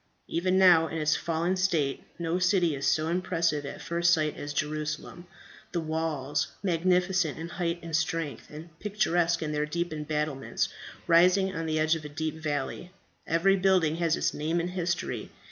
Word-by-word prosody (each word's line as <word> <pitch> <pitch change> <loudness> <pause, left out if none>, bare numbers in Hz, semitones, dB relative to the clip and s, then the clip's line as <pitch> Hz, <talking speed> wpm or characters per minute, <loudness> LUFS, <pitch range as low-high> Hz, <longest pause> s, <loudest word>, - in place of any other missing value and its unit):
Even 185 +2 +1
now 175 -4 +6
in 160 - -5
its 155 0 +2
fallen 170 +3 -1
state 170 -7 0 0.2
no 170 +1 -1
city 180 -3 +3
is 140 - -2
so 155 0 +2
impressive 165 -4 0
at - - -8
first 170 0 +2
sight 155 -3 +2
as 145 - -6
Jerusalem; 155 +3 -3 0.5
the 175 - 0
walls, 155 -3 -1 0.2
magnificent 180 -2 +1
in 165 +1 -6
height 170 -1 -2
and 165 -2 -3
strength, 160 -2 -2
and 155 +3 -10
picturesque 175 -5 +1
in 150 - -2
their 150 0 -1
deep 170 +1 -2
embattlements, 150 -2 -2 0.4
rising 185 +3 +4
on 165 0 -3
the 155 0 0
edge 155 +1 +3
of 165 -2 -3
a 150 - -7
deep 160 +1 -3
valley. 145 +3 -3 0.4
Every 175 +4 +3
building 185 -5 +3
has 170 -2 +2
its - - 0
name 160 +3 -1
and 175 +1 -2
history. 180 -1 -2
165 Hz, 170 wpm, -28 LUFS, 155-175 Hz, 0.5 s, now